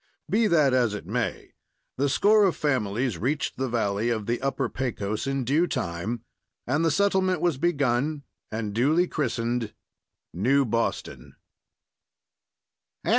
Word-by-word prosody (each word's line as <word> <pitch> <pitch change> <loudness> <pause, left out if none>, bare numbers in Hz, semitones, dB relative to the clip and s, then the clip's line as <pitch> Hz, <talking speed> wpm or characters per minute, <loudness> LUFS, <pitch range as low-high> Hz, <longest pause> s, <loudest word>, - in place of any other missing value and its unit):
Be 225 +1 +2
that 150 -8 +4
as 120 -5 +2
it 105 - -7
may, - - -3 0.4
the 140 +2 +1
score 210 +8 +4
of 185 - +1
families 120 - -1
reached 140 +7 -1
the 130 -1 -1
valley 110 -1 0
of 110 -3 -1
the 120 +3 -1
Upper 135 -1 -1
Pecos 110 -3 -3
in 135 -1 -1
due 150 +8 +2
time, 100 - -3 0.4
and 145 +6 +1
the 165 - +3
settlement 190 +1 +2
was 170 -7 0
begun 145 -2 0 0.3
and 110 -2 -3
duly 155 - +3
christened 120 -6 -2 0.6
New 130 - +2
Boston. 115 0 -3
130 Hz, 130 wpm, -26 LUFS, 115-155 Hz, 0.6 s, that